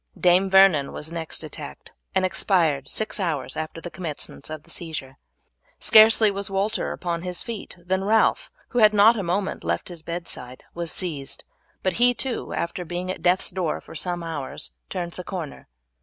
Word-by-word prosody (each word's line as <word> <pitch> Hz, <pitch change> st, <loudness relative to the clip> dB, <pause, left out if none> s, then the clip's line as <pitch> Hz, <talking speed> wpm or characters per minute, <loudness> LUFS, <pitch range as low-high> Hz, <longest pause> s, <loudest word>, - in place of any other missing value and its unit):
Dame 180 Hz, +2 st, +4 dB
Vernon 190 Hz, -7 st, +6 dB
was 155 Hz, +2 st, -6 dB
next 165 Hz, -1 st, -1 dB
attacked, 150 Hz, -1 st, -7 dB, 0.2 s
and 190 Hz, 0 st, +3 dB
expired 165 Hz, -7 st, +2 dB
six 220 Hz, 0 st, +2 dB
hours 150 Hz, -9 st, -2 dB
after 160 Hz, +1 st, -5 dB
the 175 Hz, +1 st, -8 dB
commencement 155 Hz, -4 st, -6 dB
of 155 Hz, -1 st, -7 dB
the -, -, -16 dB
seizure. 150 Hz, -5 st, -6 dB, 0.6 s
Scarcely 220 Hz, -1 st, +7 dB
was 200 Hz, 0 st, -3 dB
Walter 195 Hz, +2 st, -1 dB
upon 170 Hz, -2 st, -3 dB
his 180 Hz, 0 st, -3 dB
feet 225 Hz, -6 st, -7 dB
than 185 Hz, +2 st, -1 dB
Ralph, 220 Hz, +2 st, +3 dB, 0.2 s
who 245 Hz, -, 0 dB
had 215 Hz, -1 st, +6 dB
not 210 Hz, +3 st, +7 dB
for 230 Hz, -, -4 dB
a -, -, -4 dB
moment 190 Hz, +3 st, -1 dB
left -, -, -1 dB
his 175 Hz, -2 st, -8 dB
bedside, 160 Hz, -7 st, -6 dB
was 170 Hz, -1 st, -2 dB
seized, 150 Hz, -7 st, -3 dB, 0.4 s
but 185 Hz, -, 0 dB
he 245 Hz, 0 st, +5 dB
too, 260 Hz, -1 st, -2 dB
after 170 Hz, +1 st, -3 dB
being 175 Hz, +2 st, -4 dB
at -, -, -7 dB
death's 180 Hz, +1 st, +2 dB
door 175 Hz, -3 st, -1 dB
for -, -, -13 dB
some 175 Hz, +2 st, -2 dB
hours, 145 Hz, -, -4 dB, 0.2 s
turned 175 Hz, -1 st, -3 dB
the 180 Hz, -, -8 dB
corner. 175 Hz, -6 st, -6 dB
175 Hz, 180 wpm, -24 LUFS, 160-195 Hz, 0.6 s, Scarcely